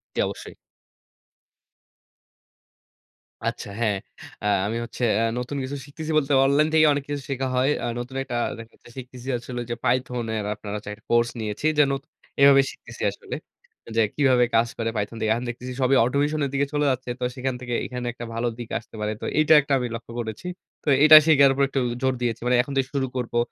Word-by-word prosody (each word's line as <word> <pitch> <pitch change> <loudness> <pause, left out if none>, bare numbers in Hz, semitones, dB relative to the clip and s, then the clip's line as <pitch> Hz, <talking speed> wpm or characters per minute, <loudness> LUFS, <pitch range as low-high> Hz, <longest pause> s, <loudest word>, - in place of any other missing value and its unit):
জ্বি, - - -2
অবশ্যই। - - -8 2.9
আচ্ছা, - - -4
হ্যাঁ। 105 -3 +1 0.5
আ - - -4 0.2
আমি 115 +2 -2
হচ্ছে 125 - -6 0.2
আ - - +2 0.2
নতুন 125 +4 -4
কিছু 135 +2 -4
শিখতেছি 155 +2 -6
বলতে 145 -1 +1
অনলাইন 145 +3 +3
থেকে 155 -1 +6
অনেক 145 -1 -2
কিছু 145 -1 -3
শেখা 135 -1 -1
হয়। 130 +2 +3
আ - - -1
নতুন 125 +2 -7
একটা 125 -2 -5 0.2
দেখা 115 0 -11
যাচ্ছে - - -18
শিখতেছি 125 0 -9
হচ্ছে 120 +1 -7
হলো 120 - -3
যে, - - -1
python 125 -1 0
এর 105 -1 -2
আপনারা 105 -1 -7
হচ্ছে 105 - -8
একটা 105 +1 -16
কোর্স 120 0 +4
নিয়েছি। 110 +5 -4
যে, 150 - +7
নতু 135 +2 -4 0.3
এভাবে 140 0 +8
শিখতেছি - - -13
আসলে। - - -8 0.6
যে, - - +6
কিভাবে 130 -4 +4
কাজ 115 +1 +4
করে 115 -1 -1
python 105 +2 -3
দিয়ে। 110 - 0
এখন 120 - -3
দেখতেছি 125 +2 -6
সবই 130 +1 +4
automation 145 +5 0
এর - - -3
দিকে 140 0 +1
চলে 145 0 +1
যাচ্ছে। 130 0 -4
তো - - -4
সেখান 130 0 -2
থেকে 120 -1 -4
এইখানে 125 -1 -5
একটা 120 - -7
ভালো 115 +1 -1
দিক 120 -2 -7
আসতে 115 - -17
পারে। 105 0 -1
তো - - -4
এইটা 155 +1 +5
একটা 140 0 -2
আমি 125 - -2
লক্ষ্য 115 0 -9
করেছি। 110 - -5 0.4
তো - - -21 0.2
এইটা 155 0 +11
শিখার 140 -3 +6
উপরে 140 +1 +2
একটু 135 - 0 0.2
জোর 130 0 +2
দিয়েছি। 115 -2 -1
মানে 125 0 +3
এখন 140 - -8
থেকে 130 - +1
শুরু 135 -1 +1
করবো 125 -2 -2
125 Hz, 205 wpm, -24 LUFS, 120-140 Hz, 2.9 s, এইটা